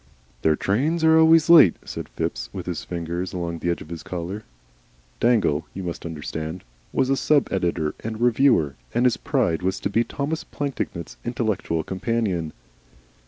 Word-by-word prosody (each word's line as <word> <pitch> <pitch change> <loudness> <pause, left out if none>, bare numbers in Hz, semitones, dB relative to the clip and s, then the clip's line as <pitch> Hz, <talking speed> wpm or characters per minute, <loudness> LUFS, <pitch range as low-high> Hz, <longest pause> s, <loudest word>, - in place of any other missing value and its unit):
"Their 80 -1 +3
trains 145 - 0
are 160 0 +6
always 160 0 +6
late," 165 - +8
said - - -6
Phipps, - - -3
with - - -6
his - - -4
fingers 85 +1 -4
along 85 -2 -3
the 85 - -1
edge 85 - -1
of - - -16
his 85 -2 -6
collar. 90 +4 -5 0.8
Dangle, 105 -11 +2
you 95 - -5
must 85 -1 -5
understand, 80 +2 -5 0.3
was 130 0 +1
a - - +4
sub 145 +1 +2
editor 85 -5 0
and 110 0 -5
reviewer, 120 - +3 0.2
and 120 - +3
his 125 - +3
pride 80 0 0
was 95 +1 -1
to 100 - -2
be 115 +3 +3
Thomas 150 +6 -3
Plantagenet's 135 -11 -4
intellectual 110 -9 -1
companion. 95 -4 -1
95 Hz, 165 wpm, -24 LUFS, 85-125 Hz, 0.8 s, late